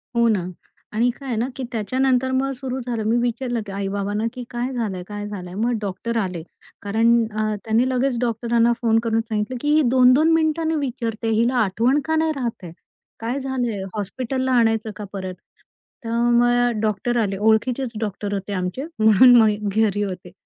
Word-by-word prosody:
हो 235 0 +4
ना. 205 -6 +1 0.5
आणि 235 +3 +2
काय 275 - -10
आहे 235 - -1
ना, 235 - 0
की 265 - -5
त्याच्यानंतर 255 +4 +1
मग 270 +1 0
सुरू 260 0 -4
झालं. 235 -3 -3
मी 235 - +3
विचारलं 240 -1 -1
की 200 - -8
आई-बाबांना, 200 +2 -2
की 250 - -6
"काय 245 +1 -3
झालंय? 205 -7 -3
काय 205 0 -6
झालंय?" 180 -4 -7
मग 230 +4 0
डॉक्टर 220 +4 -3
आले 185 -5 -2 0.4
कारण 225 +3 +2 0.3
अ, 215 -1 0
त्यांनी 230 +3 +2
लगेच 255 -1 0
डॉक्टरांना 235 0 +1
फोन 225 -1 +3
करून 225 -1 +1
सांगितलं, 220 +2 -3
की 295 +1 +1
"ही 310 - +5
2-2 260 +6 +5
मिनिटांनी 320 0 +1
विचारते. 230 -5 -3
हिला 235 +3 +2
आठवण 230 +8 +1
का 320 - 0
नाही 315 0 +2
राहत 240 -6 -4
आहे? 170 - -8 0.5
काय 235 +4 -2
झालंय? 245 -7 -2
हॉस्पिटलला 255 +5 -2
आणायचं 225 -1 +1
का 210 - -7
परत?" 185 -2 -5 0.7
तर 230 - -4 0.3
मग 240 -2 +2
डॉक्टर 220 +3 0
आले. 195 -2 -1
ओळखीचेच 230 +4 +1
डॉक्टर 205 -1 -3
होते 200 +1 -4
आमचे. 185 +9 -3
म्हणून 220 +3 +7
मग 210 -1 +1
घरी 205 -2 +2
होते. 185 -3 -6
230 Hz, 175 wpm, -22 LUFS, 210-255 Hz, 0.7 s, म्हणून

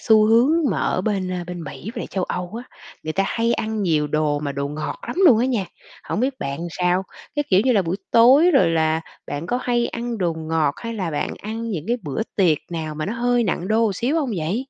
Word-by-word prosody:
xu 215 -2 +5
hướng 230 +5 +5 0.2
mà - - -1
ở - - 0
bên, 195 -2 -1
ơ, 180 -1 -3
bên 175 -1 -6
Mỹ 180 +8 -7
về 235 - -4
châu 190 -2 -2
Âu 180 0 -4
á, - - -25 0.3
người 155 - -2
ta 195 - +1
hay 230 +2 +1
ăn 220 -1 -2
nhiều 155 -5 +2
đồ 150 0 0
mà 145 -2 -3
đồ 140 0 -3
ngọt 150 +1 -4
lắm - - -4
luôn 245 -9 +7
á 250 - +2
nha 230 -8 0 0.4
hổng - - -2
biết 260 +1 -1
bạn 140 0 -3 0.2
sao? 180 +1 +2 0.3
Cái, 290 - +1
kiểu 190 0 +6
như 260 - +4
là, 205 -4 +3
buổi 170 +2 -2
tối 265 +9 +6
rồi 270 - +4
là 160 -1 +1 0.3
bạn 145 +4 -4
có 245 +6 0
hay 240 -1 +1
ăn 235 -1 -4
đồ 175 -3 +1
ngọt 160 -2 0
hay 230 0 -5
là 185 -6 -2
bạn 150 - -2
ăn 225 +2 -4
những 170 -7 -3
cái 240 - +2
bữa 150 +5 -2
tiệc 170 -7 +3
nào 160 -2 -4
mà 155 0 -3
nó 210 - -2
hơi 245 0 +1
nặng 185 -2 -2
đô 225 +1 +3
một 210 - 0
xíu 260 - 0
hông 290 -6 0
vậy? 170 +6 -1
195 Hz, 250 wpm, -22 LUFS, 160-230 Hz, 0.4 s, luôn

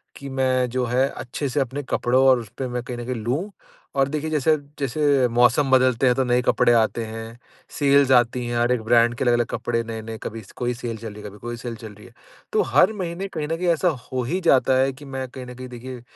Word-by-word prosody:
कि 140 - -8
मैं 130 -1 +1
जो 125 +1 -1
है 125 +3 +2
अच्छे 130 +4 -5
से 140 - -1
अपने 135 +2 -2
कपड़ों 130 +2 +2
और 130 -2 +6
उसपे 120 +3 -6
मैं 125 0 -3
कहीं 125 -1 -6
न 120 - -6
कहीं 125 0 -3
लूँ, 130 - -2 0.4
और 135 -1 +3
देखिए 155 +1 -3
जैसे 155 0 +2 0.2
जैसे 140 -1 +2
मौसम 125 +4 +3
बदलते 130 -1 +4
हैं 125 - +4
तो 135 - +1
नए 125 0 +2
कपड़े 120 - +3
आते 115 0 +2
हैं, 115 +1 -8 0.3
सेल्स 140 -2 +3
आती 120 0 +3
हैं, 120 0 -2
हर 120 +1 +2
एक 125 -3 +1
ब्रांड 120 +1 +4
के - - -2
अलग-अलग 120 -1 +3
कपड़े 115 -1 -2
नए-नए, 110 0 -6
कभी 115 +1 -6
कोई 125 0 -1
सेल 120 -1 -5
चल 110 -1 -8
रही 105 - -10
है 105 - -6
कभी 105 - -14
कोई 120 +2 -6
सेल 120 0 -6
चल 110 -2 -10
रही 105 - -15
है। - - -19 0.4
तो - - +4
हर 185 +10 +5
महीने 185 0 -4
कहीं 155 -5 -4
न 165 - -1
कहीं 180 +1 -2
ऐसा 175 +3 0 0.2
हो 130 -1 -1
ही 170 +10 -1
जाता 135 -5 +4
है 135 +1 +2
कि 145 +2 -13
मैं 135 -1 -5
कहीं 125 0 -9
न 125 - -9
कहीं 130 +1 -8
देखिए 125 0 -8
125 Hz, 245 wpm, -23 LUFS, 120-135 Hz, 0.4 s, और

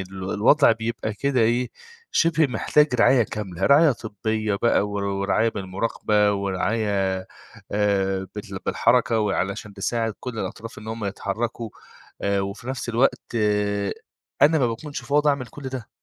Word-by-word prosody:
ال 95 0 -5
الوضع 125 +6 +5
بيبقى 110 -1 -3
كده 135 +1 0
إيه، 120 +2 +2 0.4
شِبه 165 -2 +3
محتاج 150 +4 +2
رعاية 125 +1 +5
كاملة، 100 -5 -3
رعاية 145 +1 +6
طبّية 110 -1 -2
بقى 105 -1 +2
ور 100 -1 -3
ورعاية 100 +3 +1
بالمُراقبة 105 +1 0
ورعاية 100 0 0 0.5
آآ 95 -2 +1
بتل 100 -2 -6
بالحركة 115 -1 +2
وعلشان 100 +1 -2
تساعد 115 +2 -1
كل 125 -3 -6
الأطراف 115 +1 -6
إن 110 0 -10
هم 110 -1 -4
يتحرّكوا 110 +3 -3 0.5
آآ 100 0 +1
وفي 100 +5 -5
نَفْس 130 -2 -4
الوقت 120 +1 0 1.1
أنا 155 +2 +6
ما 125 - +3
باكونش 140 +4 -5
فاضي 145 +4 +2
أعمل 135 -3 -2
كل 140 +5 -12
ده. 130 -2 -6
110 Hz, 140 wpm, -24 LUFS, 100-125 Hz, 1.1 s, رعاية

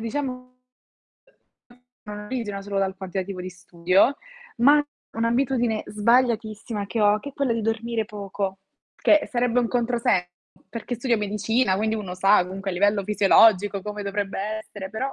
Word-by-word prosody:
diciamo 255 +2 -4 2.1
solo 200 0 -3
dal 190 -1 -1
quantitativo 190 0 -5
di 185 - -5
studio, 180 +7 +1 0.4
ma 290 +5 +5 0.3
un'abitudine 235 -1 0
sbagliatissima 220 -1 0
che 225 +3 -3
ho, 205 0 +4
che 285 - -7
è - - -10
quella 270 -3 0
di 230 -1 -2
dormire 225 +1 -1
poco, 200 -2 -5 0.4
che 305 - +3
sarebbe 245 0 +1
un 235 - -1
controsenso, 235 -7 0 0.4
perché 230 +3 -5
studio 240 0 +1
medicina, 210 +1 0
quindi 220 +2 0
uno 200 -5 -5
sa 195 +2 +4
comunque 195 +2 -5
a - - -4
livello 200 +2 +2
fisiologico 205 0 +4
come 210 0 -5
dovrebbe 200 0 -3
essere 210 -2 -6
però, 260 +6 -3
210 Hz, 140 wpm, -24 LUFS, 195-235 Hz, 2.1 s, ma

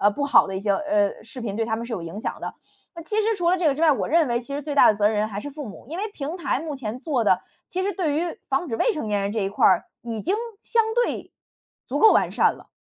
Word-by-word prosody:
呃， 205 - +5
不 285 +7 -2
好 280 - +5
的 190 - -3
一 - - -3
些， 200 -1 +1
呃， 205 -6 0
视 230 +3 -9
频 205 -4 -3
对 225 +1 0
他 220 - -1
们 230 - -5
是 240 - -7
有 205 - -2
影 170 +5 -7
响 - - -4
的。 - - -5 0.4
那 335 - -6
其 425 +6 0
实 445 +1 +1
除 345 -2 +1
了 370 - +3
这 345 - +1
个 275 - +2
之 310 - -5
外， 310 -2 +6
我 - - -2
认 330 0 +4
为 240 -1 0
其 275 +3 -9
实 290 - -2
最 295 0 -4
大 280 - +7
的 210 - -1
责 205 - +4
任 215 - +2
人 215 +1 +1
还 200 - -5
是 290 +8 -5
父 290 -6 -7
母， 200 - -11
因 320 +5 -6
为 430 +2 -2
平 305 +2 -4
台 335 - 0
目 315 -3 -5
前 245 -2 -5
做 260 -3 0
的， 185 -2 +4 0.3
其 370 - -2
实 400 +1 0
对 330 -5 -1
于 335 +2 -2
防 275 +5 0
止 225 - -2
未 470 - +2
成 300 - -4
年 205 -1 0
人 200 - -1
这 225 - -2
一 195 - 0
块 205 - 0
儿， 185 -2 +4 0.2
已 230 -2 -4
经 370 - 0 0.3
相 460 -1 +2
对 485 0 -1 0.6
足 - - -2
够 440 - +8
完 - - +3
善 - - +3
了。 - - -17
270 Hz, 335 characters per minute, -24 LUFS, 215-330 Hz, 0.6 s, 够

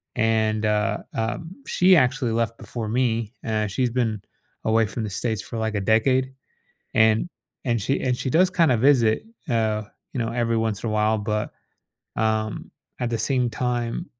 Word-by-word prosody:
And, 110 -1 +1
uh 105 0 +1 0.2
um, 115 +9 -3 0.2
she 185 +1 +5
actually 130 -2 +2
left 115 0 -1
before 115 -3 -5
me; 115 -2 0
eh, 110 -1 0
she's 125 +5 0
been 115 -4 -1 0.4
away 110 0 +3
from 110 +1 -4
the 105 - -3
States 105 +3 -1
for 115 - -7
like 110 -1 -1
a 100 - 0
decade. 130 +5 +2 0.6
And 110 +8 +4 0.4
and 115 -4 +1
she 135 +7 0
and 125 -1 +1
she 130 - -2
does 180 +6 +4
kinda 165 -9 +3
visit, 120 - +4 0.3
oh, 110 -3 0 0.3
you 130 - -2
know, 115 -1 -1
every 115 -1 0
once 110 -2 -1
in 115 - -1
a 110 - -2
while, 110 +1 +2
but, 105 0 -2 0.7
um, 110 -1 -1 0.3
at 120 - 0
the 115 - 0
same 125 -3 +1
time, 120 +6 -2
115 Hz, 175 wpm, -24 LUFS, 110-125 Hz, 0.7 s, she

